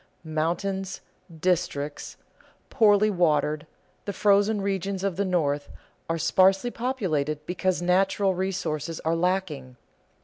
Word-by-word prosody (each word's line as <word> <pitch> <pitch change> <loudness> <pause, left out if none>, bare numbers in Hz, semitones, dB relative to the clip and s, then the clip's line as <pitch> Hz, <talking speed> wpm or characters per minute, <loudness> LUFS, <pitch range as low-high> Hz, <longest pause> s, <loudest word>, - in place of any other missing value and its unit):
Mountains, 180 +5 -2 0.3
districts 160 -4 -2 0.5
poorly 210 -1 +4
watered, 155 -4 +1 0.4
the 200 - -3
frozen 205 +2 +3
regions 195 -1 -2
of 195 -3 -1
the 200 - 0
North, 150 -6 0 0.4
are 165 - 0
sparsely 190 +7 +3
populated 155 - -2
because 180 +1 -1
natural 190 +2 +2
resources 175 -4 -3
are 160 +1 0
lacking. 165 -7 -2
180 Hz, 105 wpm, -26 LUFS, 155-195 Hz, 0.5 s, poorly